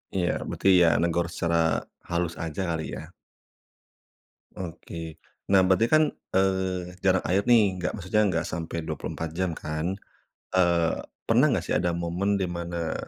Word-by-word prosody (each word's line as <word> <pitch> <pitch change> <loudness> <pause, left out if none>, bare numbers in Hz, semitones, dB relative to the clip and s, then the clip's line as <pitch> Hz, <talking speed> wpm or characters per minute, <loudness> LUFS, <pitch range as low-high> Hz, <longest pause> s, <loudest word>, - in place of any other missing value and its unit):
Iya. 90 -2 +1 0.2
Berarti, - - -2 0.2
ya, - - +5
negor 85 0 +1
secara 85 -1 +1 0.3
halus 85 -1 -1
aja 80 +3 -3
kali, 80 -1 -2
ya. - - -9 1.4
Oke. 80 -2 -7 0.3
Nah, 95 - +7
berarti, 95 +5 +4
kan, 155 0 +6 0.3
eee, 95 -2 0
jarak 95 -1 +3
air, 95 +2 +2
nih, 105 -6 +5
enggak, 90 - -1
maksudnya 105 +2 0
enggak 85 -4 0
sampai 85 0 -4
24 80 0 -4
jam, 95 -1 0
kan. 80 +5 -3 0.6
Eee, 85 -2 +2 0.2
pernah 120 +6 +4
enggak, 95 -9 0
sih, - - -2
ada 85 -1 0
momen 90 +4 0
di 95 - 0
mana 85 -1 -3
90 Hz, 145 wpm, -26 LUFS, 85-95 Hz, 1.4 s, Nah